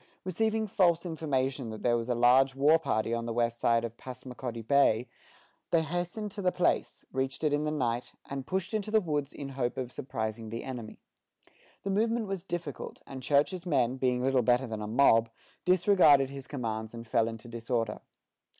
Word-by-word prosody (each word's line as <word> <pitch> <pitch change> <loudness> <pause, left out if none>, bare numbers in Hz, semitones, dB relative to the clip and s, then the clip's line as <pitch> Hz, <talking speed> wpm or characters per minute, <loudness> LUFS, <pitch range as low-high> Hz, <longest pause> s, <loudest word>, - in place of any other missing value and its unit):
Receiving 220 +4 0
false 175 -4 +2
information 135 -6 -1
that 110 -1 -7
there 120 -1 +3
was 115 +1 -2
a 120 - +2
large 130 +3 +5
war 150 +4 +5
party 110 -6 0
on 115 0 -2
the 115 - -2
west 120 0 0
side 115 0 +2
of 115 0 -7
Passamaquoddy 125 -2 -7
Bay, 125 -2 +3 0.6
they 165 -1 +3
hastened 175 +6 -3
to 200 - -6
the 180 -1 +2
place, 180 0 0
reached 130 +3 -2
it 150 -2 +2
in 145 +1 +1
the - - 0
night, 125 -5 -1
and 135 -1 -6
pushed 190 +2 -2
into 215 -1 -1
the 220 0 +4
woods 150 -7 -2
in 140 -1 -7
hope 130 -3 -2
of 125 -2 -3
surprising 110 -4 -4
the 115 +1 -5
enemy. 120 -5 -7 0.8
The 195 - -1
movement 225 +3 +1
was 195 -3 -4
difficult; 170 -5 -5
and 135 -1 -8
Church's 150 +7 +1
men, 130 -5 +2
being 125 -1 +1
little 130 -1 +3
better 125 +2 +3
than 110 -3 -5
a 105 - -4
mob, 115 -1 +4 0.4
disregarded 175 -7 +5
his 135 -1 -8
commands, 110 -4 -4
and 115 0 -8
fell 115 0 +2
into 115 0 -7
disorder. 115 -1 -2
130 Hz, 185 wpm, -30 LUFS, 115-165 Hz, 0.8 s, large